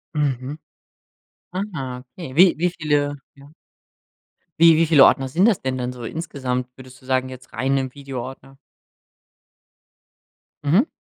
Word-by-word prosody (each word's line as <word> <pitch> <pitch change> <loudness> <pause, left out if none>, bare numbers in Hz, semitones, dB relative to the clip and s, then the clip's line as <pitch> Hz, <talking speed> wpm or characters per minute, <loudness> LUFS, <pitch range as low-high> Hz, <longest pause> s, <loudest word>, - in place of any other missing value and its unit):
Mhm. 140 -1 -1 1.2
Ah, 130 -5 -5
okay. 140 -6 -9
Wie 180 +1 +7
wie 175 +2 +1
viele, 150 -4 0 0.2
ja? 140 0 -16 1.1
Wie 165 -1 +8
wie 165 +1 +3
viele 155 -4 +7
Ordner 135 0 +3
sind 175 +9 +3
das 220 -6 +2
denn 130 -1 -2
dann 125 0 -3
so 125 -1 -10
insgesamt 130 -4 -3
würdest 130 -1 -14
du - - -19
sagen, 130 0 0
jetzt 130 0 -12
rein 135 +4 0
im 130 -1 -3
Videoordner? 135 -1 -8 2.1
Mhm. 180 - +3
135 Hz, 135 wpm, -22 LUFS, 130-155 Hz, 2.1 s, Wie